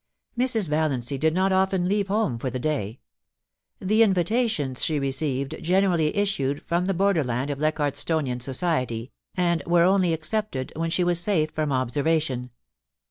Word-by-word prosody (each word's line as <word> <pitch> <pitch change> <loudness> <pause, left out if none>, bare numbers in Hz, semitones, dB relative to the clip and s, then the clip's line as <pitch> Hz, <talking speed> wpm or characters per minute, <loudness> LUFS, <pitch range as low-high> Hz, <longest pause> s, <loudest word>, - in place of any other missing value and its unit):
Mrs. 235 -5 +2
Vallancy 140 -4 -1
did 160 +2 +1
not 190 +1 +2
often 190 -1 +1
leave 200 0 0
home 200 - 0
for 130 - -2
the 130 - -4
day. 125 -5 -2 0.8
The 215 +4 +2
invitations 190 - +1
she 155 - 0
received 135 -1 -2
generally 175 -2 +1
issued 145 -9 0
from 175 +1 0
the 195 0 0
borderland 145 -9 +1
of 140 - -5
Leichardtstonian 150 -3 0
society, 130 -3 -1 0.2
and 170 -3 +1
were 170 0 +4
only 185 -1 +3
accepted 160 -3 -3
when 165 +1 -2
she 180 +2 +1
was 175 -1 +2
safe 170 -5 +1
from 155 -2 -2
observation. 135 0 0
160 Hz, 145 wpm, -25 LUFS, 135-190 Hz, 0.8 s, were